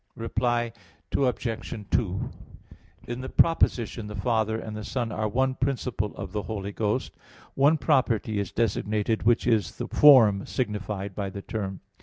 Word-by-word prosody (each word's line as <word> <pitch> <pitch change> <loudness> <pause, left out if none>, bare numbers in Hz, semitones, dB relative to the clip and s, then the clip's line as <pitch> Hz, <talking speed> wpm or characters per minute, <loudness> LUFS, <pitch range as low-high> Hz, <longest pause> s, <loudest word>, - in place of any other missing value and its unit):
Reply 120 +1 -1 0.4
Obj. 120 -4 -1
2: 100 -3 0 0.8
In 120 +1 -4
the 130 - -5
proposition 120 -9 +2
"the 105 - -7
Father 110 +1 0
and 110 -1 -6
the 110 - -5
Son 120 +1 -2
are 110 +1 -1
one 130 +4 +1
principle 125 -5 -2
of 95 -2 -6
the 105 +1 -2
Holy 100 -2 -5
Ghost," 105 0 -1 0.4
one 145 +4 +4
property 125 -6 +1
is 100 -3 -3
designated 110 0 0
which 120 +2 +3
is 115 -4 +1
the - - -4
form 115 -9 +7
signified 105 -4 -3
by 100 0 -3
the 100 +1 -8
term. 95 -4 -4
110 Hz, 150 wpm, -26 LUFS, 105-125 Hz, 0.8 s, form